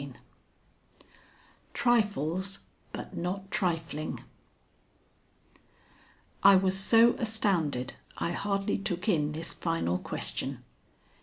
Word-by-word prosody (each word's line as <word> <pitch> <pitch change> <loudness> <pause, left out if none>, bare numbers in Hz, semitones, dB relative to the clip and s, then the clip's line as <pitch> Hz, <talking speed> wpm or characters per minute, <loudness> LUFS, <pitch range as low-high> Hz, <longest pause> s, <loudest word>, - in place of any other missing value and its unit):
XXV - - -8 1.6
TRIFLES, 200 - +1 0.3
BUT - - -7
NOT 190 +3 -3
TRIFLING 165 -4 -2 2.2
I 200 0 +8
was 190 0 +3
so 225 +4 +6
astounded 180 - 0 0.2
I 170 - -1
hardly 195 +2 -1
took 185 -1 -2
in 150 -7 +2
this 160 +2 -4
final 165 - -1
question. - - -3
185 Hz, 85 wpm, -29 LUFS, 165-200 Hz, 2.2 s, I